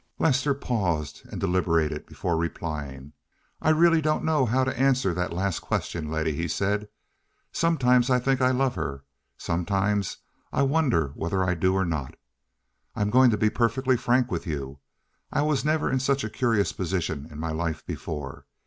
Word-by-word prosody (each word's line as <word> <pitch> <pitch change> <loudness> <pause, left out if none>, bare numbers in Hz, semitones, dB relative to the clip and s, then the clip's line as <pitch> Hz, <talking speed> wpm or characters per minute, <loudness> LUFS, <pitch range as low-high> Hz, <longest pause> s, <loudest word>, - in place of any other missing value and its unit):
Lester 140 -1 +2
paused 90 - -2
and - - -5
deliberated 80 -4 0
before 85 - -2
replying. 75 -4 -4 0.5
"I - - +2
really 165 +1 +5
don't 155 0 0
know 150 -5 +2
how 130 +4 +2
to 130 - -1
answer 130 -6 +2
that 90 +1 -2
last 95 +1 -1
question, 80 -3 -3
Letty," 80 0 -1
he 85 +3 -2
said. 105 +5 -1 0.6
"Sometimes 125 -7 +3
I 125 - +4
think 130 +1 +1
that 130 - +4
I - - +3
love 130 0 +1
her; 70 - -4 0.3
sometimes 100 +3 -1 0.3
I - - +1
wonder 135 - +2
whether 85 +6 -2
I 90 0 +1
do 95 +2 +1
or 95 -1 +1
not. 80 -6 -3 0.8
I'm 105 0 0
going 130 +1 +6
to 110 - +1
be 110 +1 +2
perfectly 125 +3 +1
frank 125 +1 +1
with - - -3
you. 70 -3 -4 0.5
I 145 - +1
was 150 -2 +1
never 155 +1 +1
in 130 - +1
such 135 +1 +1
a 110 - -4
curious 115 -5 +1
position 80 -5 -2
in 75 -1 -10
my 80 0 -2
life 80 0 -3
before. 70 -2 -6
100 Hz, 175 wpm, -26 LUFS, 80-130 Hz, 0.8 s, going